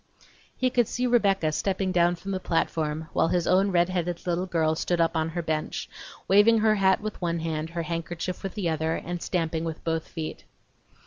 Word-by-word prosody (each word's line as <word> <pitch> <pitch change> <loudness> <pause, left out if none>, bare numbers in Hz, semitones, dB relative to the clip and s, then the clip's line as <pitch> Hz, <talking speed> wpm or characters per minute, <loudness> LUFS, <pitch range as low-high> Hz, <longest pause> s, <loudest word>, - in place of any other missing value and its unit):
He 255 0 +1
could 240 -3 +2
see 250 - -2
Rebecca 200 -9 +3
stepping 190 +3 -1
down 175 -1 +3
from 195 +3 -7
the 190 - -1
platform, 160 -3 -1
while - - +3
his 175 0 +1
own 190 +2 +3
red 175 -1 +3
headed 175 -1 -2
little 180 +1 -1
girl 160 -3 +1
stood 170 +2 -1
up 165 0 +2
on 160 0 0
her 170 +1 -3
bench, 155 -1 -2 0.4
waving 205 +4 +6
her 220 0 +4
hat 190 -2 +3
with 215 -2 -5
one 170 -1 0
hand, 160 -1 -3
her 170 0 -3
handkerchief 170 +2 -4
with 195 - -5
the 200 -5 -1
other, 160 0 0
and 175 0 -5
stamping 165 -3 -1
with 165 -1 -5
both 165 -1 -1
feet. 160 -1 -6
175 Hz, 200 wpm, -26 LUFS, 165-190 Hz, 0.4 s, waving